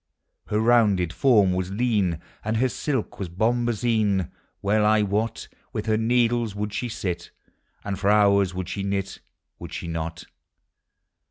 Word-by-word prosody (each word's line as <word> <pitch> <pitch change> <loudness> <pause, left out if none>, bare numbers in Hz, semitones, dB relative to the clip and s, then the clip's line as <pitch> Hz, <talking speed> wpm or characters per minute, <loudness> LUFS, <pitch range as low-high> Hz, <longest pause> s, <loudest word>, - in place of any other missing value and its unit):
Her 105 - 0
rounded 105 -7 +3
form 105 -5 +4
was 90 0 -2
lean, 100 -6 0 0.2
And 110 +1 -1
her 130 +3 +2
silk 130 -3 -3
was 95 -3 -4
bombazine: 110 -2 +1 0.3
Well 105 +2 +2
I 105 0 +4
wot 105 +3 -2 0.3
With 110 -3 -3
her 110 -1 +2
needles 115 -1 +1
would 105 0 -3
she 120 +3 -2
sit, 90 -5 -4 0.5
And 100 -1 -4
for 100 - +1
hours 100 -2 +4
would 90 -1 -4
she 100 - -4
knit,— 100 -1 -3 0.4
Would - - -9
she - - -5
not? 80 0 -4
105 Hz, 150 wpm, -24 LUFS, 95-115 Hz, 0.5 s, form